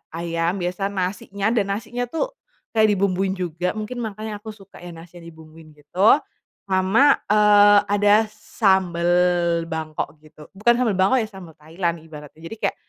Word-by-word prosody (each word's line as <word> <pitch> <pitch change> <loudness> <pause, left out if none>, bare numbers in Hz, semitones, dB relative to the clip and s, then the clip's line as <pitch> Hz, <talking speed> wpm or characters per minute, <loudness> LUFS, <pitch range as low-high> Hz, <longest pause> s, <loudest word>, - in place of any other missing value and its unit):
ayam 170 +1 -2
biasa 180 +3 -2
nasinya 195 +2 -3
dan 215 -4 0
nasinya 245 +3 -5
tuh, 325 - -3 0.4
kayak 220 -1 +3
dibumbuin 190 0 0
juga 180 0 -3
mungkin 220 +3 -5
makanya 215 -1 -6
aku 215 0 -9
suka 195 -2 -16
ya 175 -1 -10
nasinya 170 +1 -13
dibumbuin 160 -1 -15
gitu, 175 +8 +3 0.5
sama, 195 +9 +3
eee, 205 -1 +6
ada 205 0 +4 0.2
sambel 190 -5 0 0.6
Bangkok 160 -1 -5
gitu 155 -1 -16
bukan 225 +5 +3
sambel 230 -6 +1
Bangkok 190 +8 +3
ya 220 - -2
sambel 190 -5 -12
Thailand 170 +2 -3
ibaratnya 150 -1 -13
jadi 225 - -8
kayak, - - -14
190 Hz, 150 wpm, -22 LUFS, 170-210 Hz, 0.6 s, eee